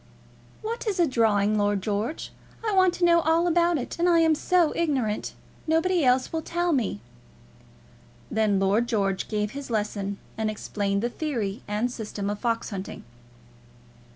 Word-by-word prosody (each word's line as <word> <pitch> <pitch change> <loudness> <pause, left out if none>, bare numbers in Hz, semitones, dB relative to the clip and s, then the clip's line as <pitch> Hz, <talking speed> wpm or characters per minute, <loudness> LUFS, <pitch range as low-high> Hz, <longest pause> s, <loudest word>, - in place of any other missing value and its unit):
"What 460 +2 -4
is 400 -3 -1
drawing, 215 -4 +2
Lord 205 -1 +1
George? 215 +9 -2 0.4
I 425 - +1
want 370 -2 +4
to 350 - +2
know 340 0 +5
all 325 +2 +2
about 345 -1 +3
it, 255 +5 -5
and 350 +1 +3
I 340 - +5
am 320 -1 +4
so 340 +1 +2
ignorant. 265 -10 -1 0.3
Nobody 330 +2 +2
else 255 +2 +2
will 325 - -1
tell 345 +2 -1
me." 220 - -1 1.3
Then 215 -3 +2
Lord 200 +5 +2
George 195 -5 0
gave 210 -1 -1
his 280 -1 -7
lesson, 205 -2 -2 0.2
and 220 -1 0
explained 200 -1 -2
the 240 - +1
theory 235 -11 -3
and 215 +4 -1
system 210 -3 -4
of 205 - -5
fox 230 -2 -1
hunting. 195 -1 -6
235 Hz, 155 wpm, -26 LUFS, 210-330 Hz, 1.3 s, know